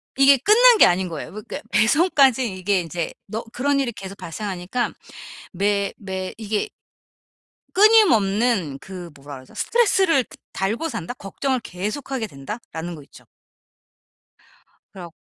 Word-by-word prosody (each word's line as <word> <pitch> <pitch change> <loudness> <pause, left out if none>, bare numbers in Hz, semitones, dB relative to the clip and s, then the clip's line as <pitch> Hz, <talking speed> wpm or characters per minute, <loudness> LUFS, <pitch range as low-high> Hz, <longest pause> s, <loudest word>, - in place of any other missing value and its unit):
이게 275 +1 +6
끝난 450 - +6
게 - - +8
아닌 180 +1 +1
거예요. 160 -3 -6
그러니까 215 +1 -7
배송까지 260 - +3
이게 185 0 0
이제 170 0 -4
너 220 +3 -4
그런 275 +3 0
일이 265 -3 0
계속 195 -3 -9
발생하니까 195 +6 -4 0.6
매 200 +1 0
매 190 -2 -5
이게 215 - -2 1.1
끊임없는 230 - +4
그 180 0 -9
뭐라 140 +1 -10
그러죠? 130 -1 -14
'스트레스를 385 - +2
드 - - -17 0.2
달고 225 +12 -1
산다? 170 - -5
걱정을 260 +5 -2
계속하게 220 +6 -4
된다?'라는 165 - -7
거 155 - -10
있죠. - - -18 1.7
그래가 175 -4 -10
210 Hz, 295 characters per minute, -22 LUFS, 180-270 Hz, 1.7 s, 게